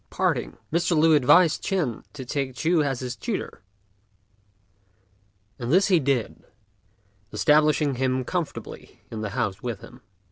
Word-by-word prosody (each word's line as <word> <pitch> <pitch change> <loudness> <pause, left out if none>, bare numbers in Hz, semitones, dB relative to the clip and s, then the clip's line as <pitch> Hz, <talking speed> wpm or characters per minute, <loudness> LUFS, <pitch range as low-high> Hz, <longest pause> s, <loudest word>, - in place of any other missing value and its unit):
At - - -42
parting, - - 0 0.2
Mr. 170 0 +2
Lü 160 +1 +5
advised 150 +4 +5
Ch'ên 160 - -1
to 135 -3 -8
take 130 0 -3
Ch'u 165 +2 +2
as 135 -4 -1
his 125 -1 -4
tutor, - - -5 2.0
and 120 +1 -3
this 190 +5 +4
he 180 -3 +5
did, 135 -5 -1 0.9
establishing 150 +5 +3
him 130 0 0
comfortably 170 +4 -6
in 110 -1 -5
the 105 - -3
house 100 -1 -1
with 120 -5 -4
him. - - -14
140 Hz, 140 wpm, -25 LUFS, 125-160 Hz, 2.0 s, Lü